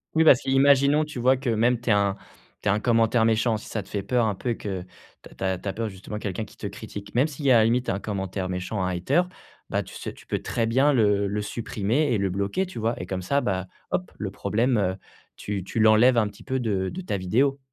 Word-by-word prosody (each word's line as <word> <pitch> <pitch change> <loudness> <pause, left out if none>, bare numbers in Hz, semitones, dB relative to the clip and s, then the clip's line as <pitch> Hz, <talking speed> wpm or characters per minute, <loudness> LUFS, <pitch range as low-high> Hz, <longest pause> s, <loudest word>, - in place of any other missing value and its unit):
Oui, 160 - +5
parce 135 -6 +7
qu'imaginons, 140 +2 +4
tu 150 -3 -9
vois, 130 +2 +3
que 130 -2 -3
même 115 +2 +2
tu 120 - -3
aies - - +6
un 100 -1 +2 0.5
tu - - 0
aies - - +5
un 105 - +1
commentaire 115 0 +3
méchant, 110 0 +2
si 105 - -11
ça 110 - -3
te 95 - -15
fait 100 -2 -3
peur 120 +3 +1
un 105 - -1
peu 120 - -4
et 115 - -1
que 95 -3 -4 0.4
tu - - -12
as - - -13
tu - - -7
as 95 -1 0
tu 100 - -9
as 95 - -1
peur 115 -1 -3
justement, 100 +2 -7
quelqu'un 105 +1 -3
qui - - -17
te - - -5
critique. 105 +1 -9
Même 130 +5 +4
s'il 150 -1 -8
y 135 - +5
a, - - +7
à - - +6
la 110 - +5
limite 120 +2 +1
1 100 - 0
commentaire 95 -2 -3
méchant, 95 +2 -3
un 90 - 0
hater. 90 - +2 0.5
Bah, - - +1
tu - - -11
ce - - -5
tu - - -17
peux - - -1
très 115 - -1
bien 135 +6 +3
le 105 -5 +3
le 105 +1 -2
supprimer, 115 +6 -1
et - - +2
le 100 0 0
bloquer, 100 - -1
tu 185 - -10
vois? 115 +1 0
Et 90 - -6
comme 95 0 -3
ça, 140 +7 +1
bah, 95 -5 -1 0.2
hop, 180 - -2
le 100 - -2
problème, 110 +6 0
heu, 95 -2 +1 0.4
tu 100 -2 -4
tu 105 - -4
l'enlèves 110 +3 +6
un 110 -2 +3
petit 105 -1 -12
peu 130 0 -2
de 100 -5 -1
de 185 - -6
ta 175 - -2
vidéo. 130 +10 +1
110 Hz, 275 wpm, -25 LUFS, 100-125 Hz, 0.5 s, parce